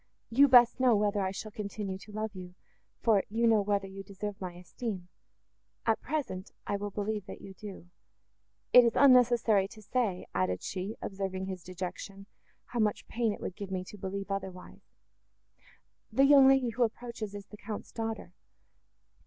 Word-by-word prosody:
"You 275 +5 +6
best 245 -2 +6
know 250 -3 +5
whether 205 0 +1
I 190 - 0
shall 210 +3 -6
continue 200 -2 -5
to 210 - -13
love 215 0 -3
you, 180 -1 -9 0.5
for 215 -4 +4
you 230 +3 +1
know 225 -2 +5
whether 200 -1 0
you 195 0 -8
deserve 200 +1 -6
my 180 -2 -4
esteem. 180 +1 -6 0.8
At 225 -1 +2
present, 255 -11 -3 0.2
I - - -1
will 205 +1 -3
believe 210 0 -3
that - - -8
you 195 - -10
do. 190 -2 -10 0.9
It 250 - +10
is 235 -1 +2
unnecessary 240 -6 +5
to 215 +1 -13
say," 210 -5 -1
added 90 0 0
she, 195 +3 -4
observing 190 -1 -3
his 190 -2 -5
dejection, 185 +2 -6 0.4
"how 240 - -4
much 215 -2 0
pain 230 -1 0
it - - -7
would 185 - -5
give 200 -2 -6
me 185 -1 -2
to 210 - -10
believe 195 +1 -4
otherwise.—The 195 +7 -6
young 275 -1 +8
lady, 270 -2 +4
who 230 +2 -4
approaches, 230 -2 -2
is 200 -1 -7
the 210 - -13
Count's 210 -1 -7
daughter." 225 -1 -4
205 Hz, 170 wpm, -30 LUFS, 190-230 Hz, 0.9 s, It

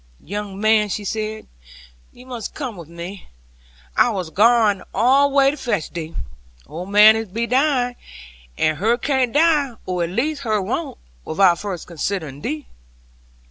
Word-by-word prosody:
'Young 200 +1 -6
man,' 215 0 +3
she 205 +1 -3
said, 215 +1 -3 0.7
'you 250 - -16
must 245 -4 -7
come 260 -7 -5
with 170 -4 -11
me. 170 +3 -9 0.7
I - - +4
was 185 -7 -4
gwain' 215 -1 +4
all 265 +6 +4
the 275 - -7
way 275 -1 +5
to 295 - -8
fetch 220 - -2
thee. 165 -1 -6 0.5
Old 170 +6 -7
man 215 +2 +7
be 225 +4 -3
dying; 255 -1 +1 0.6
and 155 -1 +1
her 225 +5 +2
can't 260 -1 0
die, 295 -4 +3
or 180 -1 -1
at 165 - -2
least 280 - -1
her 215 -5 0
won't, 190 - -3 0.3
without 175 0 +3
first 195 -5 -5
considering 160 -4 -4
thee.' 150 0 -4
215 Hz, 155 wpm, -21 LUFS, 185-245 Hz, 0.7 s, man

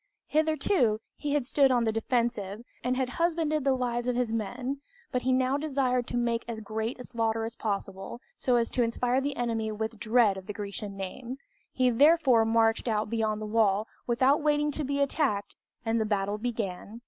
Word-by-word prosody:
Hitherto, 310 - +2 0.2
he 290 -1 -3
had 290 -4 +1
stood 275 +1 +4
on 245 -2 +3
the 225 - +2
defensive, 225 -2 -1 0.2
and 250 +1 0
had 260 -1 +1
husbanded 320 -3 +1
the 270 -1 +3
lives 240 -1 -1
of 250 - +1
his 240 -2 0
men; 245 +5 -3 0.3
but 250 - 0
he 260 - +1
now 255 +1 +2
desired 265 -5 0
to 245 - -2
make 235 -1 0
as 230 -2 -4
great 220 +2 -3
a - - -6
slaughter 225 -2 -1
as 230 +1 -6
possible, 195 0 -4 0.2
so 250 - +1
as 235 -1 +2
to 250 - +1
inspire 245 +2 +1
the 280 0 -2
enemy 225 -2 -1
with 220 +1 -4
dread 220 -3 +3
of 190 - -9
the 210 - -4
Grecian 200 -1 -5
name. 235 +7 -6 0.3
He 255 -1 +2
therefore 270 -3 +5
marched 225 +1 +2
out 215 -1 0
beyond 215 -2 0
the - - -3
wall, 210 -1 +2 0.2
without 260 +5 +3
waiting 295 0 +2
to 300 - -2
be 280 +1 -1
attacked, 270 -8 0 0.3
and 225 0 +1
the - - +1
battle 205 0 -1
began. 220 -2 -4
235 Hz, 195 wpm, -28 LUFS, 220-260 Hz, 0.3 s, therefore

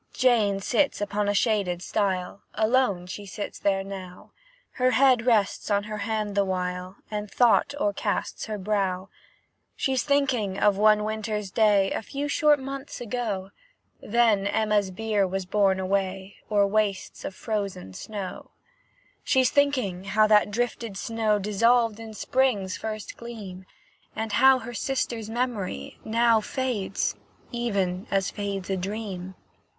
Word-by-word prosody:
Jane 220 -6 +3
sits 275 +7 +1
upon 205 0 -1
a 205 - +1
shaded 195 -6 +1
stile, 190 -2 -1
Alone 220 -5 +2
she 200 +3 -7
sits 200 +2 -6
there 195 -1 +1
now; 190 -2 -9 0.4
Her 255 0 +2
head 255 -2 +4
rests 215 -4 +2
on 200 -1 +2
her 210 0 -5
hand 215 0 -2
the 200 0 +3
while, 180 0 -3 0.2
And 210 -1 -3
thought 245 +5 +3
o'ercasts 305 -5 -1
her 215 -1 -3
brow. 195 -2 -1 0.7
She's 265 -1 0
thinking 260 -9 +1
of 205 -1 +3
one 210 +1 +4
winter's 215 -2 -3
day, 205 -3 +3
A - - -1
few 280 +6 -4
short 300 0 +4
months 275 +1 -6
ago, 210 -5 -3 0.5
Then 220 -3 +2
Emma's 210 -2 +1
bier 205 0 0
was 190 0 -3
borne 195 0 +2
away 190 0 -2
O'er 205 -2 +4
wastes 200 -1 -1
of 190 - -5
frozen 200 - -4
snow. 200 - -6 0.7
She's 260 -2 +3
thinking 255 -11 +1
how 215 +2 +3
that 210 -1 +5
drifted 230 -1 -2
snow 220 0 0
Dissolved 225 +2 +2
in 220 -1 -9
spring's 210 -8 +1
first 215 -1 -6
gleam, 205 -6 -8 0.5
And 220 0 -3
how 265 +5 +6
her 240 -1 -7
sister's 235 -3 -2
memory 225 - -3
now 230 0 +3
Fades, 230 -6 -2 0.4
even 200 -6 -1
as 195 -1 +1
fades 200 -2 -4
a 190 - 0
dream. 190 -1 -5
210 Hz, 140 wpm, -26 LUFS, 195-235 Hz, 0.7 s, how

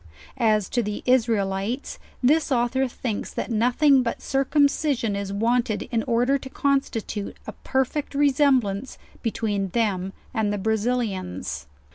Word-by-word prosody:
As 215 -4 +3
to 240 - +1
the 210 -2 -4
Israelites, 225 -1 0 0.2
this 295 +4 +3
author 260 +2 +2
thinks 235 -3 -4
that - - -3
nothing 250 +5 +4
but 235 - -2
circumcision 275 -4 +1
is 200 -1 -3
wanted 225 +1 +1
in 230 -2 +1
order 250 +3 +2
to 265 - -9
consti 275 -5 0
tute 205 -2 -5
a - - -5
perfect 270 +2 -2
resemblance 265 -6 +2 0.2
between 210 -4 -1
them 195 -2 -1 0.2
and 220 -3 0
the 205 - -1
Brazilians. 215 - -2
235 Hz, 130 wpm, -24 LUFS, 205-265 Hz, 0.2 s, nothing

